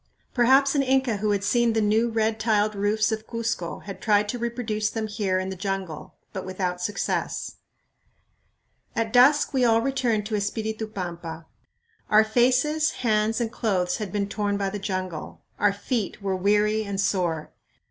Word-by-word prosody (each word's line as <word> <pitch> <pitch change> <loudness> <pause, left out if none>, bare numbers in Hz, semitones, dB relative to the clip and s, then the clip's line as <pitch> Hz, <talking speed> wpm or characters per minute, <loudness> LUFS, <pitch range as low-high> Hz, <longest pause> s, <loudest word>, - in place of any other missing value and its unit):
Perhaps 265 +3 +4
an 285 - +3
Inca 265 -4 +1
who 210 +1 -1
had 200 -1 +1
seen 235 +2 +2
the 220 - +1
new 220 +2 +2
red 220 -1 0
tiled 215 -1 +2
roofs 210 +2 +1
of 220 0 -4
Cuzco 230 -7 -3
had 195 -1 -8
tried 210 -1 +3
to 245 - -3
reproduce 230 -3 -2
them 225 -1 -3
here 205 -3 -1
in 185 0 -2
the 190 - -4
jungle, 190 -4 -4 0.2
but 190 -3 -4
without 185 -1 -3
success. 200 +2 -2 1.4
At 225 0 -1
dusk 275 +5 +5
we 260 -2 +2
all 225 -2 +4
returned 240 -6 0
to 215 0 -2
Espiritu 220 +2 -2
Pampa. 170 -5 -6 0.6
Our 215 +1 +6
faces, 255 +8 +2 0.2
hands, 215 0 +2
and 230 -2 -1
clothes 185 -7 0
had 210 -4 -5
been 200 0 -1
torn 205 0 -1
by 195 -1 -1
the 205 - -4
jungle; 185 -4 -5 0.2
our 205 - +4
feet 210 +1 -3
were 195 -2 -1
weary 210 +3 +2
and 200 -2 -4
sore. 175 -5 0
215 Hz, 170 wpm, -25 LUFS, 195-230 Hz, 1.4 s, Our